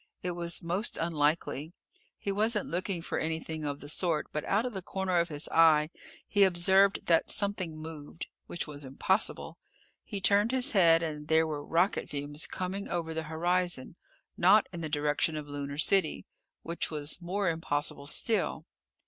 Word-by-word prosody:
It 180 - -1
was 170 +1 -3
most 180 +6 -1
unlikely. 155 -1 0 0.4
He 200 - -3
wasn't 210 +1 +1
looking 180 0 -2
for - - -2
anything 160 0 -3
of 145 -1 -4
the 145 - -9
sort, 155 0 +1
but 150 - -3
out 210 +4 +1
of 250 - -3
the 190 - -4
corner 185 -1 -1
of 170 +1 0
his 150 -1 -3
eye 160 -1 +5 0.4
he 205 -1 +4
observed 190 +2 +4
that 165 -1 +3
something 190 -6 -3
moved. 155 0 -7 0.2
Which 170 - -3
was 145 -1 -6
impossible. 140 +9 -1 0.4
He 205 - -5
turned 205 +3 +4
his 260 +2 +4
head, 170 -5 +5
and 150 -2 -4
there 160 0 +4
were 150 -2 -4
rocket 170 +6 +1
fumes 145 +1 -2
coming 190 +2 -4
over 165 -2 -2
the 160 - -2
horizon, 175 -2 -1 0.4
not 200 +4 +6
in 170 - -5
the 160 - -4
direction 150 +1 0
of 150 -1 -5
Lunar 145 0 -5
City. 180 +1 +1 0.4
Which 170 +1 -2
was 150 +2 -3
more 190 +3 -1
impossible 145 -3 -2
still. 185 -2 0
165 Hz, 165 wpm, -30 LUFS, 150-190 Hz, 0.4 s, not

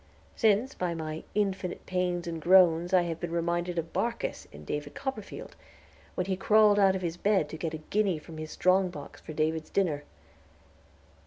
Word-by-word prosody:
Since, 225 +4 +2
by 175 -2 -2
my 155 -1 -5
"infinite 195 -3 -1
pains 180 -1 -1
and 165 -1 -4
groans," 175 -1 +5
I 185 -2 +5
have 165 -1 -4
been 175 - -4
reminded 170 +1 -1
of 165 0 -3
Barkis, 235 0 -2
in 75 +1 -12
"David 150 0 -4
Copperfield," 225 -7 -6 0.6
when 180 - -1
he 190 0 -1
crawled 210 +1 +5
out 195 -1 +5
of 185 - -4
his 170 0 -2
bed 195 -5 +2
to - - -6
get 160 -1 -3
a 155 0 -10
guinea 200 -5 +2
from 155 +1 -10
his 155 0 -6
strong 185 +2 +2
box 145 -5 -10
for 155 - -8
David's 155 +1 -1
dinner. 160 -7 0
175 Hz, 180 wpm, -29 LUFS, 160-195 Hz, 0.6 s, groans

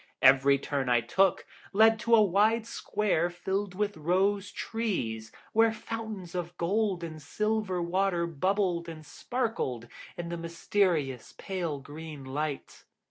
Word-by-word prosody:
Every 135 +1 +6
turn 140 -1 -2
I 120 -1 +4
took 190 +10 +2 0.3
led 220 +2 +5
to 230 +1 +4
a 215 - +6
wide 210 +4 +3
square 200 -7 0
filled 190 +2 -3
with 205 0 -1
rose 190 +5 +1
trees, 125 - -3 0.2
where 225 0 +5
fountains 220 -5 -6
of 175 -1 -4
gold 195 0 0
and 155 -2 -6
silver 210 +2 -1
water 175 0 +1
bubbled 170 +1 0
and 155 -1 -9
sparkled 150 - -3 0.3
in 170 -1 -4
the 170 - -3
mysterious 170 - -1
pale 175 -6 -3
green 145 0 -9
light. 145 +2 -4
175 Hz, 135 wpm, -29 LUFS, 155-205 Hz, 0.3 s, Every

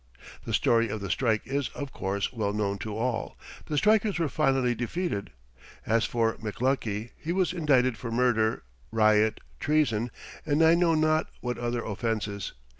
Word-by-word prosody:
The - - -4
story 115 -1 +3
of 105 - -3
the 100 -2 -4
strike 110 -4 +1
is, 140 0 -1
of 140 -2 -5
course, 100 +3 -2
well 105 -4 -1
known 100 -1 -1
to 110 -2 -5
all. 120 0 -2 0.3
The 150 - -2
strikers 210 +1 +3
were 165 -3 0
finally 135 -2 +2
defeated. 120 - -3 0.6
As 115 +1 +2
for 115 -1 0
McLuckie, 115 -1 -2
he 165 - -3
was 185 -1 +1
indicted 130 -8 +2
for 115 - -5
murder, 115 -2 +2 0.3
riot, 110 -1 +3 0.2
treason, 130 -7 +1 0.3
and 150 +1 +2
I 160 +1 +7
know 170 -1 +3
not 155 0 +2
what 125 -1 -3
other 120 -1 -2
offenses. 105 -2 -3
120 Hz, 160 wpm, -28 LUFS, 110-145 Hz, 0.6 s, I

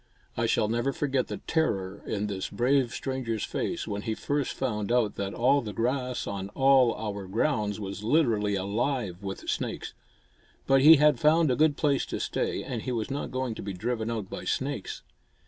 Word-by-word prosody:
I - - 0
shall 105 - +2
never 120 +5 0
forget 135 -2 -1
the - - -4
terror 100 - -1
in 105 -1 -1
this 100 -2 -3
brave 130 0 +2
stranger's 125 -6 -3
face - - -3
when 100 0 -3
he 110 0 -2
first 145 +3 -1
found 105 -5 -2
out 120 -4 +2
that 100 0 -4
all 135 +4 +3
the 105 -3 -6
grass 125 +3 -1
on 100 -1 -4
all 135 -3 +5
our 100 -3 -5
grounds 105 -1 0
was 100 0 -6
literally 110 -6 +2
alive 100 0 -2
with 95 -1 -6
snakes. - - -3 0.7
But 135 0 +4
he 155 +4 +10
had 150 -3 +4
found 155 -1 +4
a - - +2
good 150 0 +3
place 145 -3 +1
to - - -4
stay, - - -2
and 120 -3 -4
he 130 - -3
was 115 +1 -2
not 140 - -3
going 130 -2 -2
to - - -7
be 100 0 -5
driven 110 +4 -2
out 110 -4 -3
by - - -7
snakes. 135 -6 -3
120 Hz, 190 wpm, -28 LUFS, 105-135 Hz, 0.7 s, he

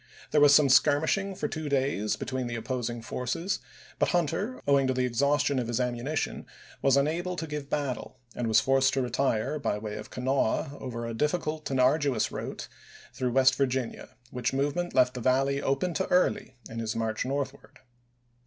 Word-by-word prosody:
There 150 - +4
was 145 -1 +8
some 150 - +6
skirmishing 155 +8 +3
for - - -2
two 155 -2 -4
days 135 -6 0
between 130 -1 -3
the 120 - -4
opposing 120 0 -3
forces, 125 - -2 0.4
but - - +2
Hunter, 175 - -1
owing 140 -1 +4
to 130 - 0
the 130 0 +1
exhaus 140 +4 +2
tion 140 -2 +1
of 120 - -2
his 120 0 -1
ammunition, 125 +5 -2 0.3
was 135 0 +4
unable 170 +6 0
to 165 - -4
give 150 -2 -6
battle, 135 -3 -3 0.2
and 120 - -2
was 110 0 +5
forced 135 0 +2
to 135 - +1
retire 125 +2 0
by 105 - -1
way 105 0 -5
of 105 - -8
Kanawha 135 +1 0
over 120 -2 -5
a 115 - -4
difficult 155 +3 -1
and 135 -1 0
arduous 140 +1 +2
route - - -5 0.5
through 125 -2 -2
West 130 0 +5
Virginia, 130 -4 -2
which 125 0 -2
movement 145 +6 -1
left 125 -1 +4
the 125 - -6
Valley 135 +3 +2
open 140 +6 0
to 190 - -1
Early 180 -7 +1
in 115 - -6
his 110 -1 -3
march 110 -1 -1
northward. 135 0 -4
135 Hz, 180 wpm, -28 LUFS, 125-145 Hz, 0.5 s, was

